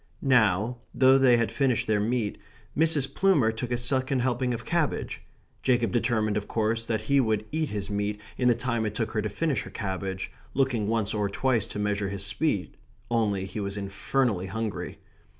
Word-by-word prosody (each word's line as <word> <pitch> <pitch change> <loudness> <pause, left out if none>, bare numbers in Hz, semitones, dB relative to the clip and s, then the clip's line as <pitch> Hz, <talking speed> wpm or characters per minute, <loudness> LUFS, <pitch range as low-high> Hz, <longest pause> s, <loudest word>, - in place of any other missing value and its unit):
Now, 120 -3 +3 0.2
though 130 +1 +6
they 125 -3 +6
had 115 -1 0
finished 130 -4 +1
their 110 -1 +2
meat, 110 0 -1 0.4
Mrs. 150 -4 +2
Plumer 175 -13 +3
took 115 +2 -5
a 120 - +1
second 130 +1 0
helping 125 0 0
of 120 0 -4
cabbage. 170 -3 -1 0.4
Jacob 120 -3 +2
determined, 110 -3 +1
of 105 - -3
course, 115 +1 0
that 110 -2 0
he 140 0 +2
would 110 -4 +1
eat 155 0 -1
his 105 -1 -4
meat 105 +1 -1 0.2
in 125 - +1
the 120 - +5
time 120 -1 -1
it 105 - -5
took 110 0 -1
her 110 - 0
to 105 - -2
finish 145 - 0
her - - -8
cabbage, 95 -2 -4 0.2
looking 130 -6 +1
once 110 -2 0
or 105 -2 0
twice 115 +1 +1
to - - -7
measure 105 -1 0
his 100 0 -4
speed 105 - -1 0.3
only 105 -5 +1
he 95 - -6
was 100 0 -3
infernally 100 +1 0
hungry. 110 +2 -4
115 Hz, 185 wpm, -27 LUFS, 105-130 Hz, 0.4 s, though